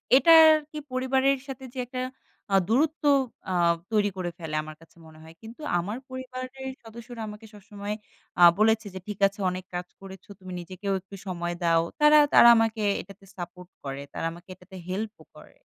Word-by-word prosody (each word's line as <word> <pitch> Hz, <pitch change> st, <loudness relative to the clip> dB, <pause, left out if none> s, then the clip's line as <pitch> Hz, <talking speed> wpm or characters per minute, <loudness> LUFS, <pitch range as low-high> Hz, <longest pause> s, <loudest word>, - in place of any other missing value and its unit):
এটার 320 Hz, +3 st, +8 dB, 0.2 s
কি 305 Hz, -, -8 dB
পরিবারের 265 Hz, +1 st, +2 dB
সাথে 265 Hz, -1 st, -8 dB
যে 260 Hz, -, -6 dB
একটা 255 Hz, +1 st, -5 dB, 0.5 s
আ -, -, +6 dB
দূরত্ব 300 Hz, +8 st, +1 dB, 0.5 s
আ -, -, -1 dB, 0.4 s
তৈরি 210 Hz, -2 st, +2 dB
করে 175 Hz, -2 st, -3 dB
ফেলে, 160 Hz, -2 st, -5 dB
আমার 155 Hz, 0 st, -10 dB
কাছে 165 Hz, -, -20 dB
মনে 155 Hz, 0 st, -16 dB
হয়। 160 Hz, 0 st, -13 dB
কিন্তু 230 Hz, +6 st, -12 dB, 0.2 s
আমার 205 Hz, +6 st, -4 dB
পরিবারের 260 Hz, +1 st, -7 dB
সদস্যরা 230 Hz, +1 st, -10 dB
আমাকে 210 Hz, +1 st, -10 dB
সবসময় 205 Hz, 0 st, -7 dB, 0.5 s
আ -, -, +7 dB, 0.2 s
বলেছে 220 Hz, +1 st, +3 dB
যে, 190 Hz, -, -6 dB
"ঠিক 210 Hz, -2 st, -6 dB
আছে 200 Hz, +2 st, -12 dB
অনেক 185 Hz, 0 st, -6 dB
কাজ 180 Hz, 0 st, -4 dB
করেছো, 190 Hz, 0 st, -12 dB
তুমি 185 Hz, -1 st, -10 dB
নিজেকেও 185 Hz, +3 st, -4 dB
একটু 195 Hz, +1 st, -12 dB
সময় 175 Hz, -1 st, -3 dB
দাও।" 165 Hz, -1 st, +4 dB, 0.2 s
তারা 300 Hz, 0 st, +7 dB, 0.2 s
তারা -, -, +9 dB
আমাকে 225 Hz, -1 st, +1 dB, 0.2 s
এটাতে 195 Hz, +1 st, -15 dB
সাপোর্ট 180 Hz, 0 st, -8 dB
করে। 140 Hz, 0 st, -5 dB
তারা -, -, -4 dB
আমাকে 170 Hz, +3 st, -14 dB
এটাতে 190 Hz, +2 st, -16 dB
হেল্পও 205 Hz, +4 st, -5 dB
করে। -, -, -16 dB
210 Hz, 175 wpm, -26 LUFS, 180-255 Hz, 0.5 s, তারা